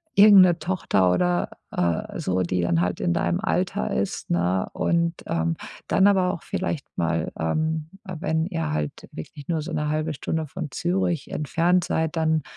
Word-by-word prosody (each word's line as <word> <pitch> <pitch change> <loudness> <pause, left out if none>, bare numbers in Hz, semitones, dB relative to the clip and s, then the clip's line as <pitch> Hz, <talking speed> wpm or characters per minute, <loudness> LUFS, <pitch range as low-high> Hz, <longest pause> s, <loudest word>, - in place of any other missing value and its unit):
irgendeine 195 -4 +7
Tochter 155 - +1
oder, 90 0 +1 0.2
äh, 85 -2 -1
so, 95 0 0
die 90 0 0
dann 85 -1 +2
halt 90 0 -1
in 85 - +1
deinem - - 0
Alter 65 - -1
ist, - - -2
ne? 90 +2 +1
Und, 170 0 +1
ähm, 80 0 0 0.3
dann 190 - +3
aber 190 -3 +4
auch 170 - -7
vielleicht 170 -6 -3
mal, 85 -1 0
ähm, 155 - -1 0.2
äh, 185 - -5
wenn 160 0 0
ihr 165 -4 -2
halt 75 -1 -4
wirklich 140 - -9
nur 160 -3 -1
so - - -6
'ne 150 0 -1
1/2 155 +1 -1
Stunde 160 +3 -2
von 155 +1 -6
Zürich 175 -1 -1
entfernt 170 +4 +1
seid, 160 0 -1
dann, 160 -1 +1
155 Hz, 170 wpm, -24 LUFS, -, 0.3 s, irgendeine